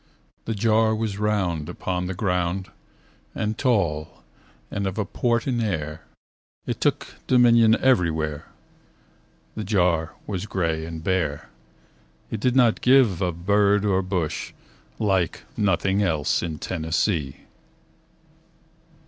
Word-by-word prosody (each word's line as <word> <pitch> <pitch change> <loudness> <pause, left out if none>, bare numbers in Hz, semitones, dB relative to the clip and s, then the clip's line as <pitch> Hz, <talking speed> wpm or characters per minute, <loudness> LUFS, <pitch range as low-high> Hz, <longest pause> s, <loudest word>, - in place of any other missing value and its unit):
The 110 - -2
jar 110 +1 +3
was 110 -2 -3
round 95 -7 -1
upon 90 0 -3
the 95 - -4
ground 90 0 -1 0.6
And 110 0 -1
tall 85 - -1 0.5
and 100 -1 -2
of 95 - -4
a 105 - 0
port 120 +2 0
in 120 -3 0
air. 80 -7 -3 0.6
It - - -4
took - - -1
dominion 120 -3 +5
everywhere. 80 - +1 1.1
The 110 - -5
jar 90 -5 +1
was 100 0 -4
gray 80 -4 -1
and 80 -1 -7
bare. 80 -6 -1 0.8
It 110 - -3
did 125 +3 +1
not 120 -4 +4
give 125 -8 +4
of 85 -2 -3
bird 100 0 +3
or 95 -2 +2
bush. 90 -4 -3 0.4
Like 95 -5 0
nothing 95 0 +1
else 80 -7 +1
in 80 -3 -4
Tennessee. 80 -2 -2
95 Hz, 120 wpm, -24 LUFS, 85-110 Hz, 1.1 s, dominion